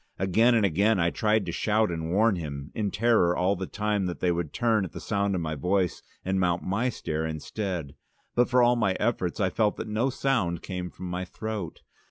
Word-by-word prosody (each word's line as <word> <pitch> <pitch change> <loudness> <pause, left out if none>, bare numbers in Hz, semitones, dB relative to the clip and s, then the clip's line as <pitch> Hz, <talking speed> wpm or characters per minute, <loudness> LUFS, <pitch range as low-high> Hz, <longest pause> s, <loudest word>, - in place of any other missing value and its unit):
Again 110 +6 +3
and 110 -3 +3
again 100 +4 +2
I 85 0 +2
tried 110 -2 +1
to 85 - -3
shout 110 +3 +1
and 80 -1 -3
warn 105 +2 +3
him, 70 -3 -6
in 105 -2 -1
terror 105 -6 +3
all 95 +3 +2
the 95 0 -5
time 105 -2 -1
that 90 - -5
they 90 - +2
would 85 -3 -2
turn 115 -3 +1
at 90 -3 -6
the - - -6
sound 100 -2 0
of 90 - -1
my 80 -1 -2
voice 90 +4 0 0.2
and 95 +1 0
mount 90 -2 +1
my 115 +7 0
stair 80 -9 -3
instead, 80 0 -4 0.4
but 120 0 +3
for 125 0 +4
all 120 0 +5
my 110 -5 +1
efforts 95 -7 -1
I 95 -2 +1
felt 105 -2 +1
that - - -5
no 110 +5 0
sound 120 -11 0
came 90 -1 -4
from 95 - -9
my 90 +1 -3
throat. 105 -1 -6
95 Hz, 220 wpm, -27 LUFS, 85-110 Hz, 0.4 s, all